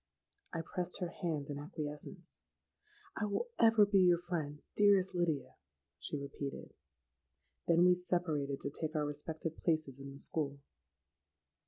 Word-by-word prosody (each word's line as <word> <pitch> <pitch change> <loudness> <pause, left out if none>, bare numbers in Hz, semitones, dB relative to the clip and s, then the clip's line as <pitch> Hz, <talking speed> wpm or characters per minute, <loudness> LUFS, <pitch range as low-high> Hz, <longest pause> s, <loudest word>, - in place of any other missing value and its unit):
'—I 165 - -2
pressed 180 +2 -3
her 180 -3 -1
hand 155 -5 -3
in 145 - -4
acquiescence.—'I 185 - -8
will 210 - -1
ever 225 -2 +7
be 200 -1 +4
your 180 -2 +6
friend, 160 -4 -4
dearest 200 -2 +5
Lydia,' 170 -5 -1 0.4
she 150 - -2
repeated.—Then 70 - -3
we 180 - +7
separated 165 -6 -1
to 140 - -3
take 155 +2 -3
our 150 -1 +1
respective 155 +2 -4
places 155 -5 0
in 140 0 -7
the 135 - -10
school. 140 -1 -1
160 Hz, 130 wpm, -35 LUFS, 140-180 Hz, 0.4 s, ever